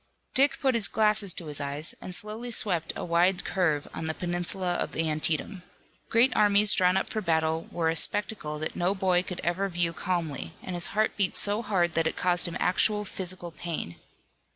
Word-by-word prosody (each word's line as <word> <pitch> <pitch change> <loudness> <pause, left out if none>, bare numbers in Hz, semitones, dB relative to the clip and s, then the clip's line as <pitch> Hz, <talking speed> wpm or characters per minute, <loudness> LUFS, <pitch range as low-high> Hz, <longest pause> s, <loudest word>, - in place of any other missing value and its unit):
Dick 275 +2 +2
put 265 -2 +1
his 230 -4 +3
glasses 210 -2 +3
to 170 - -7
his 150 -1 -2
eyes, 145 +3 +1
and 180 - -4
slowly 215 +5 -2
swept 180 -8 +2
a - - -5
wide 175 +2 +1
curve 160 -6 0
on - - -5
the 160 0 -2
peninsula 175 +1 -2
of - - -3
Antietam. 160 +4 -2 0.5
Great 235 +3 +3
armies 205 0 +5
drawn 180 0 +3
up 190 - -1
for 215 - -4
battle 160 -2 -1
were 165 -2 -1
a 160 - +1
spectacle 185 -4 0
that 155 +1 -4
no 180 +3 0
boy 185 -2 +1
could 180 -1 -7
ever 185 +3 -1
view 170 -2 0
calmly, 160 - -4
and 185 - -6
his 175 -1 +4
heart 215 0 +1
beat 195 -3 0
so 205 +2 +4
hard 185 -6 0
that 165 -1 +1
it - - -4
caused 180 0 +2
him 170 - -5
actual 210 +3 +1
physical 180 -2 -2
pain. 160 - -5
180 Hz, 195 wpm, -27 LUFS, 165-205 Hz, 0.5 s, armies